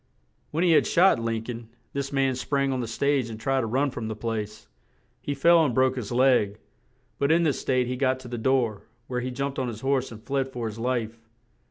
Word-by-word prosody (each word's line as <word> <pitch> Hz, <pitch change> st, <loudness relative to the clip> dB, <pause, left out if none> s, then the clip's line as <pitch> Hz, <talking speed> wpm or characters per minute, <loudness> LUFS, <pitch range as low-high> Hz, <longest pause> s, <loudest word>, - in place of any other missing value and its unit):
When 160 Hz, +3 st, -1 dB
he 175 Hz, -, +4 dB
had 160 Hz, -, +4 dB
shot 180 Hz, -5 st, +4 dB
Lin 115 Hz, -1 st, -2 dB
coln, 115 Hz, -1 st, -7 dB, 0.2 s
this 140 Hz, 0 st, -3 dB
man 135 Hz, -1 st, +2 dB
sprang 135 Hz, +2 st, 0 dB
on 130 Hz, -, -2 dB
the 120 Hz, -, -3 dB
stage 135 Hz, +1 st, 0 dB
and 110 Hz, -1 st, -7 dB
tried 135 Hz, +3 st, +1 dB
to 115 Hz, -, -2 dB
run 135 Hz, +5 st, +1 dB
from 115 Hz, -3 st, -5 dB
the 110 Hz, -, -4 dB
place; 105 Hz, -1 st, -4 dB, 0.5 s
he 145 Hz, -, -3 dB
fell 170 Hz, +4 st, +5 dB
and 130 Hz, -6 st, 0 dB
broke 130 Hz, 0 st, +3 dB
his 125 Hz, -4 st, -5 dB
leg; 120 Hz, -5 st, +3 dB, 0.6 s
but 140 Hz, +2 st, +2 dB
in 170 Hz, +1 st, +4 dB
this 150 Hz, -4 st, 0 dB
state 130 Hz, -1 st, +1 dB
he 125 Hz, +1 st, -3 dB
got 130 Hz, 0 st, +1 dB
to 130 Hz, -, -10 dB
the 120 Hz, -1 st, -5 dB
door, 120 Hz, -4 st, +1 dB, 0.2 s
where 125 Hz, 0 st, -3 dB
he 125 Hz, -, -3 dB
jumped 135 Hz, +2 st, -3 dB
on 130 Hz, -, -1 dB
his 115 Hz, -2 st, -6 dB
horse 135 Hz, -1 st, 0 dB
and 110 Hz, -1 st, -11 dB
fled 135 Hz, 0 st, -1 dB
for 120 Hz, -3 st, -4 dB
his 110 Hz, 0 st, -5 dB
life. 115 Hz, -2 st, -2 dB
130 Hz, 230 wpm, -26 LUFS, 115-135 Hz, 0.6 s, fell